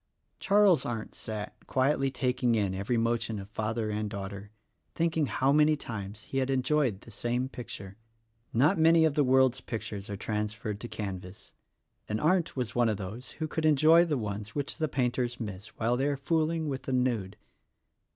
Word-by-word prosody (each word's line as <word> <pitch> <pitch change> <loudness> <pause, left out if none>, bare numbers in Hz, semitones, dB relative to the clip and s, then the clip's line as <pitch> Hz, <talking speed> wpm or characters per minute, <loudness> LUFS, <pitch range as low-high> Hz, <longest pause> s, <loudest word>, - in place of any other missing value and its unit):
Charles 200 -4 +4
Arndt 115 -3 -4
sat, 105 -2 -5
quietly 135 +1 +2
taking 125 -2 +1
in 100 -3 +1
every 100 +5 -1
motion 115 -1 0
of 100 +1 -8
father 110 +1 -2
and 105 0 -2
daughter, 100 0 -6 0.5
thinking 160 -3 +1
how 135 +2 +2
many 150 +1 +5
times 105 -6 -7
he 135 - -2
had 130 0 0
enjoyed 130 -5 +1
the - - -14
same 120 +2 -1
picture. 100 -6 -8 0.5
Not 140 +8 +3
many 165 0 +6
of 155 - +2
the 145 - +3
world's 130 -1 +4
pictures 110 -4 -5
are 100 - -4
trans 105 +1 -2
ferred 105 -2 -5
to 120 - -6
canvas, 95 -4 -7 0.6
and 105 +1 -1
Arndt 170 +1 +2
was 125 -4 -2
one 120 -2 +3
of 105 - 0
those 105 +6 -7
who 160 - -3
could 160 +1 -3
enjoy 155 +2 +6
the 155 -5 0
ones 105 -2 -5
which 145 +2 -3
the 155 - +1
painters 125 -2 -1
miss 105 -3 -6
while 115 +2 +1
they 135 +3 +1
are 145 -1 0
fool 155 +3 +1
ing 165 -1 -2
with 135 -2 -3
the 130 - -4
nude. 120 -7 0
120 Hz, 185 wpm, -29 LUFS, 105-145 Hz, 0.6 s, many